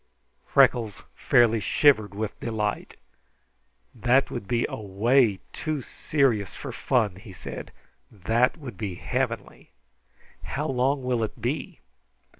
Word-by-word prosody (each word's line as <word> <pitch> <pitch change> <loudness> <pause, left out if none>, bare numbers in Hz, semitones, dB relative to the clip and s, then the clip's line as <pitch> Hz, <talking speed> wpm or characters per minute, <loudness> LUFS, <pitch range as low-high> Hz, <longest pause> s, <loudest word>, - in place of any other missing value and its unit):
Freckles 120 -6 +3
fairly 115 -2 +3
shivered 110 -1 +3
with 105 0 -4
delight. 105 -3 -3 1.0
"That 125 +3 +2
would 115 -5 -5
be 120 -1 +1
away 110 +2 +2 0.2
too 155 -4 -3
serious 115 - 0
for - - -6
fun," 110 -8 0
he 100 +1 -12
said. 90 - -8 0.4
"That 115 - +1
would 125 - -9
be 100 -5 -3
heavenly. - - -3 0.7
How 150 +3 -3
long 135 0 +1
will 125 -2 0
it 110 - -5
be?" - - -3
115 Hz, 115 wpm, -26 LUFS, 105-130 Hz, 1.0 s, Freckles